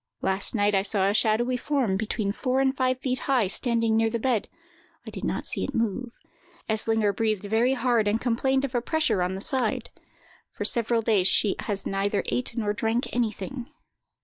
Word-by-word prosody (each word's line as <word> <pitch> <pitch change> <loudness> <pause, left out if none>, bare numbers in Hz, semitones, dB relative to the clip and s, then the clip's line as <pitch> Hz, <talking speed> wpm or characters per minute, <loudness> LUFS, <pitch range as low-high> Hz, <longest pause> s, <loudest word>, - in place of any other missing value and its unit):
Last 190 +4 -1
night 205 -1 +2
I 195 - +3
saw 195 -1 +2
a 200 - +2
shadowy 230 +4 +2
form, 255 -7 0
between 210 0 -1
four 255 +4 -1
and 270 0 +2
five 255 -1 +1
feet 255 -2 -1
high, 255 -5 +3
standing 230 +2 0
near 225 0 +3
the 235 - -2
bed; 230 -2 0 0.6
I - - -7
did - - -8
not - - -2
see - - +1
it - - -4
move. 230 +2 -1 0.6
Eslinger 220 -1 +1
breathed 215 -2 0
very 225 +5 +2
hard, 240 -3 +1
and 210 +2 +1
complained 265 +3 +1
of 270 - -7
a 240 - +1
pressure 305 - +1
on 180 +1 -1
the 190 - -6
side. 250 -1 -1 0.6
For - - -4
several 235 -1 +2
days 210 -5 +3
she 200 +1 +2
has 200 -2 -2
neither 200 +1 0
ate 245 -1 -2
nor 210 -3 0
drank 230 +3 -1
anything. 240 +2 -3
225 Hz, 190 wpm, -26 LUFS, 205-250 Hz, 0.6 s, I